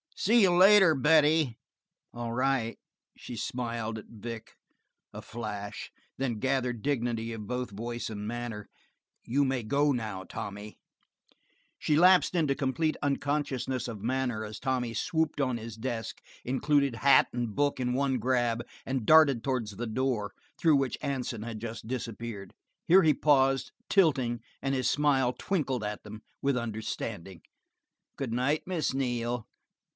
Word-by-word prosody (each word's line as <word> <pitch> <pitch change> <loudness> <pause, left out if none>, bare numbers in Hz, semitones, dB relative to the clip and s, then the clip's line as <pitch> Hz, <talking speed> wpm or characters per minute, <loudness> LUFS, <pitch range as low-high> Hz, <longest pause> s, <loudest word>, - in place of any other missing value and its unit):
"See 230 +4 +4
you 185 - +5
later, 190 -2 +7
Betty." 150 -2 +3 0.6
"All 120 -1 -4
right." 125 -2 0 0.4
She 120 - -8
smiled 115 -2 -3
at - - -12
Vic 115 0 -8 0.6
a - - -7
flash 105 -3 -6 0.3
and - - -3
then - - -8
gathered 125 -3 -1
dignity 115 -5 -1
of 105 -2 -7
both 125 0 -3
voice 120 +4 -4
and 105 -1 -5
manner. 120 -3 -5 0.6
"You 140 +5 +1
may 130 -2 -1
go 140 +6 +2
now, 110 -7 -3
Tommy." 100 +2 -7 1.0
She 150 - +1
lapsed 180 +3 +5
into 155 -5 +2
complete 155 +4 0
unconsciousness 140 -3 -1
of 110 -4 -7
manner 125 -2 -1
as 105 0 -7
Tommy 125 -3 -1
swooped 160 +3 0
on 130 -3 0
his 115 -1 -7
desk, 115 0 -4 0.3
included 140 0 +1
hat 140 +4 +5
and 120 -4 -3
book 145 -2 +1
in 125 -1 0
one 135 0 +1
grab, 120 -1 0 0.2
and 130 -4 -2
darted 150 -7 +6
towards 125 -6 -1
the 120 +4 -4
door 110 -3 -1 0.3
through 160 -3 +5
which 135 -2 0
Hansen 125 -5 -3
had 115 -1 -6
just 115 0 -7
disappeared. 115 -4 -5 0.3
Here 185 +3 +7
he 155 -1 +5
paused, 135 -2 +2 0.2
tilting, 130 - +2 0.2
and 135 0 0
his 130 -2 +1
smile 135 -4 +2
twinkled 135 - -2
at 105 0 -4
them 105 +1 -9 0.2
with 140 -2 +2
understanding. 110 -5 -5 0.8
"Good 130 -5 -3
night, 135 +6 +1
Miss 175 -7 -1
Neal. 120 -3 -2
125 Hz, 145 wpm, -29 LUFS, 115-140 Hz, 1.0 s, later